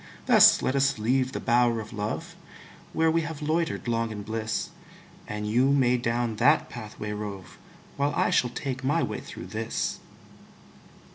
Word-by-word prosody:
Thus - - +7
let 130 - 0
us 135 -1 +2
leave 130 +4 +1
the - - -4
bower 120 -1 +2
of 110 +1 -8
love, 105 0 -4 0.6
Where 160 0 +2
we 165 +1 +2
have 160 -2 -6
loitered 160 -2 -1
long 115 -1 0
in 105 -1 -6
bliss; 110 +1 -3 0.6
And 105 0 -4
you 125 +5 +3
may 130 -3 +3
down 120 -2 -1
that 145 +7 +3
pathway 105 -2 -7
rove, 105 -3 -7 0.4
While 140 0 0
I - - +2
shall 125 - +2
take 130 +1 -5
my 145 +3 +1
way 105 -3 -3
through - - -9
this. - - -3
120 Hz, 160 wpm, -27 LUFS, 110-140 Hz, 0.6 s, Thus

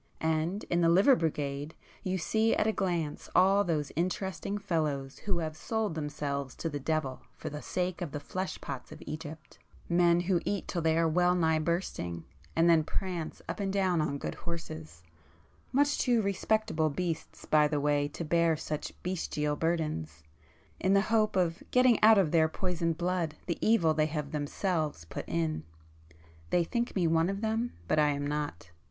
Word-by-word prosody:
And 160 +5 0
in 175 0 0
the 165 - +5
Liver 195 +11 +6
Brigade 145 - -2 0.3
you 190 0 -1
see 220 +6 +2
at - - +1
a 220 - +3
glance 175 -7 -2
all 195 +2 +5
those 155 -6 -1
interesting 190 +4 -2
fellows 155 -9 -2
who 195 -4 -1
have 160 -2 -3
sold 220 +1 -2
themselves 145 -3 -3
to 165 - -3
the 145 -2 -4
devil 140 -2 -1
for - - -6
the 150 0 -6
sake 180 0 -2
of 170 -5 -3
the 145 - -4
flesh 185 +6 -4
pots 135 -3 -6
of - - -10
Egypt,—men 165 +3 -1
who 175 -1 +1
eat 200 -1 -2
till 175 - -2
they 160 0 +2
are 165 0 +3
well 180 +2 +3
nigh 160 -2 +2
bursting, 155 - -2 0.3
and 165 +1 +4
then 165 -2 +5
prance 175 0 -4
up 170 - -4
and 195 -1 -1
down 190 -4 +2
on 145 -2 -1
good - - -4
horses,—much 155 - -4
too 240 -4 +3
respectable 200 -4 +1
beasts 165 +2 -4
by 150 -1 +4
the 150 -1 0
way 145 0 +2
to 165 +3 -6
bear 170 0 +3
such 150 -1 -4
bestial 150 -5 -1
burdens—in 145 - -3
the 200 - +5
hope 215 -2 +3
of 175 -1 +1
getting 250 -2 +4
out 220 0 +8
of 180 -6 +3
their 160 -2 +4
poisoned 170 -2 -1
blood 175 -3 -1
the 170 - -2
evil 185 -8 +4
they 155 0 +2
have 150 -2 -4
themselves 150 - -2
put - - -6
in. 80 -2 0 0.9
They 175 - +3
think 235 +7 -2
me 185 -3 +2
one 165 +1 +3
of 195 +1 -3
them, 225 +2 -1
but 155 - +2
I 150 -1 +4
am 145 0 -1
not." 145 - -3
165 Hz, 175 wpm, -30 LUFS, 150-185 Hz, 0.9 s, out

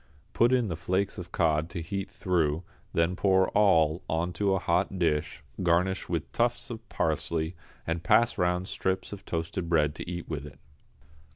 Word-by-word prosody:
Put 120 +2 +4
in 125 -3 +3
the 85 - -2
flakes 95 +5 -1
of 90 0 -8
cod 80 -1 +1
to 85 - -5
heat 95 +3 -4
through, 85 -3 0 0.3
then 85 +2 +1
pour 95 0 +3
all 85 -6 +4
on 85 +2 0
to 100 0 +1
a - - +2
hot 90 +2 0
dish, 75 -4 0 0.2
garnish 90 +2 +1
with 85 -3 -2
tufts 120 +2 0
of 115 0 -8
parsley, 80 +1 -1 0.3
and 80 0 -2
pass 110 +4 +4
round 90 +1 0
strips 95 +1 -2
of 100 - -9
toasted 85 +1 -3
bread 75 -3 +3
to 80 - -7
eat 85 -1 -5
with 75 -4 -4
it. 70 - -13
90 Hz, 175 wpm, -28 LUFS, 80-95 Hz, 0.3 s, Put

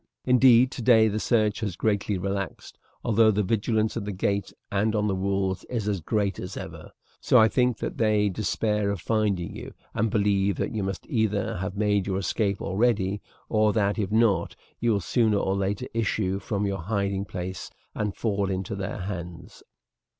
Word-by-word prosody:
Indeed, 125 0 +6
today 115 -2 +4
the 105 +1 -2
search 110 -2 +1
has 105 -6 -3
greatly 100 -1 0
relaxed, 100 -1 -4 0.2
although 110 0 +4
the 105 0 +2
vigilance 110 +2 0
at - - -3
the 105 - -4
gate 100 +1 -1 0.2
and 105 +2 +1
on 105 0 +1
the 100 - +1
walls 95 0 -1
is 115 -4 -3
as 100 -4 -1
great 100 +2 -1
as 90 - -6
ever; - - -8 0.3
so - - +4
I 110 - +7
think 125 0 +1
that - - -5
they 105 -2 +3
despair 105 +1 0
of 100 -2 -2
finding 100 -4 -1
you, - - -9 0.2
and 110 +1 +1
believe 100 -1 +2
that - - -2
you 110 - -1
must 95 -1 -4
either 105 -6 0
have 95 +2 -4
made 105 -2 +1
your 95 -1 -1
escape 100 +1 -1
already, 100 -2 +1 0.3
or 110 -1 +2
that 105 0 +1
if 100 -3 -1
not 110 -6 +2 0.2
you 115 -1 +2
will 100 - 0
sooner 110 +1 +2
or 95 -1 0
later 100 +1 -1
issue 105 -4 0
from 100 0 -2
your 100 -1 -2
hiding 100 +1 -1
place 90 -1 -6 0.2
and 105 -2 -2
fall 100 -3 -1
into 95 0 -3
their 100 +1 -4
hands." 90 -2 -7
100 Hz, 180 wpm, -26 LUFS, 95-110 Hz, 0.3 s, I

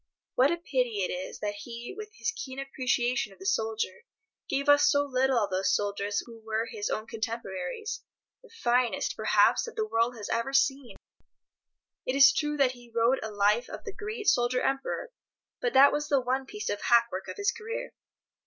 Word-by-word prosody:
What 260 +3 +4
a 340 - 0
pity 250 - -1
it - - -4
is 180 +1 -5
that 205 -1 -1
he, 235 - -7
with 430 +1 -7
his 450 - -2
keen 265 - -7
appreciation 250 -4 0
of - - -20
the 190 - -12
soldier, 220 -3 -1 0.4
gave 280 +1 -1
us 290 0 +6
so 285 0 +3
little 265 -1 +1
of 205 -4 +1
those 185 +1 +2
soldiers 205 0 -1
who 230 -2 -13
were 220 +1 -1
his 220 -3 -4
own 215 - -2
contemporaries—the 235 - -6
finest, 250 - 0
perhaps, - - +3
that 470 - -9
the 440 -1 0
world 240 - +1
has 210 - -6
ever 270 +4 -1
seen! 275 -2 +1 1.1
It 255 - -2
is 280 0 +8
true 295 -1 -1
that 270 -3 +4
he 245 -1 -15
wrote 235 +3 +2
a 220 - -4
life 210 +3 +2
of - - -8
the 415 -4 -6
great 425 +1 -5
Soldier 245 +1 +3
Emperor, 275 - -2 0.5
but 245 -1 0
that 275 +2 +8
was 295 0 -1
the 280 - +4
one 260 +1 -1
piece 420 +5 -5
of 205 - -3
hackwork 235 -5 +2
of - - -7
his 405 -1 +1
career. 455 +2 -6
250 Hz, 190 wpm, -28 LUFS, 225-285 Hz, 1.1 s, is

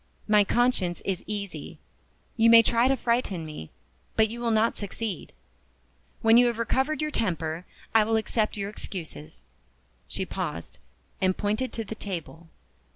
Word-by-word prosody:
My 210 -1 +6
conscience 205 -6 +1
is 190 -2 -2
easy. 205 -2 -5 0.6
You 230 -1 +5
may 230 0 +9
try 235 +2 +3
to 270 0 +2
frighten 235 -8 0
me, 150 - -8 0.5
but 220 -1 +4
you 235 +2 -6
will 235 - 0
not 225 +1 +3
succeed. 205 -2 -5 0.9
When 225 +1 +7
you 245 0 +6
have 235 -2 -1
recovered 265 +6 0
your 305 - -1
temper 170 - -2 0.3
I 225 -1 +6
will 225 +1 +1
accept 220 -1 0
your 200 0 -3
excuses." 80 - -8 0.6
She - - -3
paused, 85 - -5 0.4
and 185 -1 +2
pointed 215 +5 -1
to 225 - -3
the 220 - -6
table. 170 -5 -6
215 Hz, 155 wpm, -27 LUFS, 185-230 Hz, 0.9 s, may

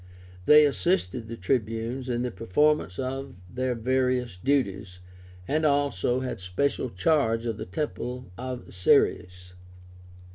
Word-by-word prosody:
They 150 0 +8
assisted 130 - 0
the 115 0 -7
Tribunes 115 +5 -2
in 120 0 -1
the 125 - -2
performance 115 -1 +1
of 135 +1 -4
their 125 +4 -2
various 125 -1 0
duties, 100 -5 -1 0.5
and 155 +2 0
also 140 -5 +1
had 130 -5 -4
special 125 +9 -1
charge 115 - +1
of 115 -3 -2
the - - -6
temple 125 +1 -4
of 125 +1 -7
Ceres. 90 0 +1
125 Hz, 120 wpm, -26 LUFS, 105-135 Hz, 0.5 s, They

